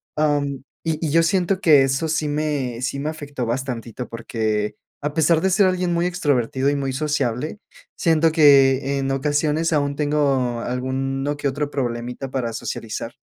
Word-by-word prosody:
am, 145 -3 0 0.2
y 160 -1 0
y - - -1
yo 165 +2 +4
siento 185 +2 +1
que 155 -8 +6
eso 135 +4 +1
sí 155 -1 0
me 145 -5 -2
sí 140 +2 -2
me 150 - -2
afectó 145 -5 -5
bastantito 120 -1 -4
porque, 110 -3 -2 0.3
a 145 0 -2
pesar 160 0 +3
de 190 - +2
ser 190 +2 +4
alguien 185 -1 +1
muy 170 +1 +1
extrovertido 140 -6 0
y 145 - +1
muy 135 -2 -2
sociable, 145 - -2 0.4
siento 165 -1 +3
que, 140 -3 +5
en 135 - -1
ocasiones, 150 +4 0
aún 145 -2 +1
tengo 140 -5 +1
alguno 135 +3 -2
que 145 - -1
otro 145 +2 -3
problemita 125 0 -3
para 120 -4 -2
socializar, 115 +1 -5
140 Hz, 165 wpm, -22 LUFS, 130-155 Hz, 0.4 s, que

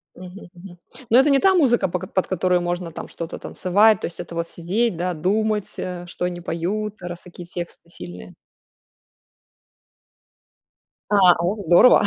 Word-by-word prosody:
Мгм, 185 +1 -11
мгм. 175 0 -13 0.3
Но 235 - +6
это 275 +3 +5
не 275 - +5
та 385 -1 +4
музыка, 245 - +3
по 180 0 -3
кот - - -10
под 190 - +1
которую 180 -1 +1
можно 175 -1 -3
там - - -7
что-то 165 0 -7
танцевать, 205 +3 +3
то - - -2
есть 170 - -9
это 170 -1 -7
вот 170 0 -2
сидеть, 190 +5 -1
да, 180 +1 -2
думать, 210 +5 -1
э, 180 -1 -5
что 180 - -4
они 180 -1 -3
поют, 200 +6 -3
раз 175 -1 -7
такие 175 -1 -11
тексты 175 -1 -8
сильные? 90 - -10 2.7
А, 195 -4 +6
о 175 +4 0
в 210 - -7
здорово. 175 +8 +6
180 Hz, 170 wpm, -22 LUFS, 175-210 Hz, 2.7 s, Но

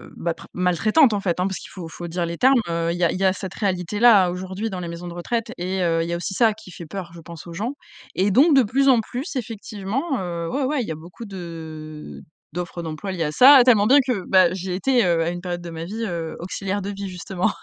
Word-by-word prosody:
bah 170 - -2
pr - - -13
maltraitantes 215 - +3
en 205 - 0
fait, 180 -3 -1
hein. 180 - +1
Parce 190 - -3
qu'il - - -11
faut 175 -4 -8
il - - -13
faut 175 - -7
dire 170 +1 -2
les 170 0 -5
termes, 260 0 +5
heu, 170 0 0
il 175 - -3
y 175 - -1
a 170 - +4
il - - -3
y 195 - 0
a 190 - +4
cette 190 0 -7
réalité-là 200 +1 +3
aujourd'hui 190 +4 -4
dans 185 -3 -5
les 175 - -5
maisons 170 +1 -7
de 175 - -7
retraite 230 +7 -3
et 185 +2 -2
heu, 165 -1 +1
il - - -4
y - - -1
a 170 - -1
aussi 180 - -4
ça 225 -3 +4
qui 210 -3 -14
fait 170 -1 -9
peur, 175 0 -7
je 170 - -11
pense 170 0 -11
aux 170 - -8
gens 220 +10 -3 0.4
et 195 +2 +1
donc 280 - +5
de 265 - +6
plus 270 +6 +1
en 250 -3 +6
plus, 260 - -6
effectivement, 225 - -3
heu, 170 -2 -4
ouais 280 - -1
ouais, 280 0 0
il - - -7
y - - -3
a - - -3
beaucoup 170 +8 -11
de 160 -5 -8 0.3
d'offres 175 0 -5
d'emplois 160 +5 -5
liées 170 -3 -2
à 150 - -1
ça. 265 - +9
Tellement 220 -5 +5
bien 275 - +7
que, 215 -8 -1
bah, 185 -2 +5
j'ai 185 -1 -4
été, 245 +5 +2
heu, 170 -2 +2
à 165 - 0
une 175 0 -5
période 175 -1 -4
de 175 - -7
ma 165 0 -6
vie, 220 +6 -4
heu, 170 -4 -4
auxiliaire 195 +3 -3
de 195 - -4
vie 200 -1 -6
justement. 185 +2 -2
185 Hz, 275 wpm, -22 LUFS, 170-220 Hz, 0.4 s, ça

